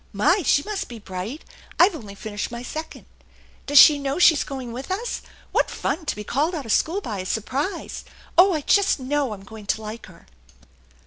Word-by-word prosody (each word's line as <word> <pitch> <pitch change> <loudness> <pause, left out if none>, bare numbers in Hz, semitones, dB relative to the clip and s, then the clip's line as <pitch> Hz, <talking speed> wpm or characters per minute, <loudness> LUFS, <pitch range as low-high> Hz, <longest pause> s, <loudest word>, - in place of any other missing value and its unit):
My! 210 - +3
She 285 -2 +3
must 420 +1 -4
be 240 - -9
bright. 205 - -7 0.3
I've 365 +2 +6
only 210 -9 -9
finished 205 0 -5
my 235 0 -7
second. 315 +5 -7 0.6
Does 290 +1 +3
she 290 +1 +9
know 280 +1 -2
she's 330 -4 +5
going 260 -4 -6
with 260 +3 -7
us? 435 +6 -3 0.3
What - - +2
fun 320 -1 -3
to - - 0
be 210 - -6
called 300 - 0
out 290 -5 -5
of 225 - -3
school 355 - +1
by 215 - -5
a 185 - -5
surprise! 265 - -3 0.3
Oh, 375 +3 +7
I 305 - -1
just 400 +2 +3
know 275 -1 -1
I'm 200 -2 -8
going 210 0 -12
to 220 - 0
like 215 +2 -7
her." - - -17
275 Hz, 200 wpm, -23 LUFS, 220-320 Hz, 0.6 s, she